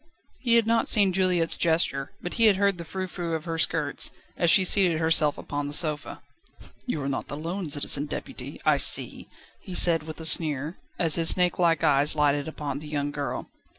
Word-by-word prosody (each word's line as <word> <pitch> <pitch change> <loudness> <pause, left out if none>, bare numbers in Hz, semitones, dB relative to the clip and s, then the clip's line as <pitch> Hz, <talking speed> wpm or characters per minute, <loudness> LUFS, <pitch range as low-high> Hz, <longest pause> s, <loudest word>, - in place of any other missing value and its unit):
He 235 -3 +1
had 230 -1 +3
not 230 0 0
seen 200 -3 +3
Juliette's 180 -3 +1
gesture, 160 -4 -1
but 175 - -5
he 230 - +2
had 210 -3 +4
heard 200 -2 0
the - - -6
frou 185 +3 -6
frou 175 -2 -5
of 160 - -7
her 165 -1 -5
skirts, 150 -2 +1 0.3
as 170 - 0
she 190 +2 +4
seated 180 -4 +3
herself 160 -2 +1
upon 145 0 -5
the 145 - -1
sofa. 150 -3 -2 0.6
"You 150 - -3
are - - -4
not 140 - -5
alone 165 +5 -6
Citizen 145 0 -2
Deputy, - - -8
I - - +3
see," - - +4 0.3
he 185 - -9
said, 165 -3 +5
with 155 +1 -10
a 160 - -6
sneer, 155 0 +1 0.2
as 165 -3 +1
his 165 - +4
snakelike 175 -2 0
eyes 145 +1 +3
lighted 145 -1 0
upon 145 -3 -6
the 150 - -10
young 145 -1 -3
girl. 145 -1 -6
160 Hz, 195 wpm, -25 LUFS, 145-180 Hz, 0.6 s, said